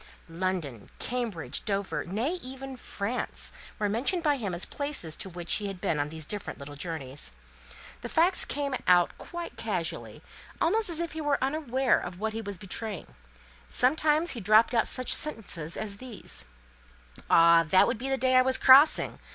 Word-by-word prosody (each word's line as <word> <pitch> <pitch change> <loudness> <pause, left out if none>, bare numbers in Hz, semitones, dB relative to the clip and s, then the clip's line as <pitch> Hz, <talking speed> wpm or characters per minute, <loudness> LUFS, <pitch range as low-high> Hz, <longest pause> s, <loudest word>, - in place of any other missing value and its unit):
London, 165 - -3
Cambridge, 235 -9 -4
Dover, 200 -1 -2
nay, 240 - -2
even 265 +1 -8
France, 235 -1 -4 0.3
were 210 - 0
mentioned 270 - -1
by 295 -3 +2
him 210 -7 -3
as 175 +1 -1
places 285 - -4
to 190 - -7
which 175 -1 -2
he 205 - -3
had 195 -2 -6
been 160 -3 -1
on 145 0 -1
these 160 0 -6
different 205 +4 -5
little 140 0 -9
journeys. 145 - -4 0.7
These - - -7
facts 350 +3 +4
came 280 -1 -2
out 175 -1 +4
quite 345 0 -7
casually, - - -4 0.4
almost 440 -2 +4
as 335 -1 +3
if 340 -1 -2
he 320 - -5
was 290 -2 +1
unaware 265 -2 +1
of 175 0 -7
what 220 +1 -2
he 225 - -4
was 200 -3 -6
betraying. 195 - -6 0.6
Sometimes 305 +5 +4
he 240 - -4
dropped 215 +4 +4
out 230 -2 +2
such 255 - +1
sentences 180 - -2
as 205 -2 -4
these: 245 -2 -9 0.8
"Ah, 170 0 +6
that 185 - +6
would 235 - -2
be 265 +2 -3
the 270 - +1
day 260 0 +1
I - - +7
was 260 0 +3
crossing! 275 +4 +6
220 Hz, 175 wpm, -28 LUFS, 180-270 Hz, 0.8 s, I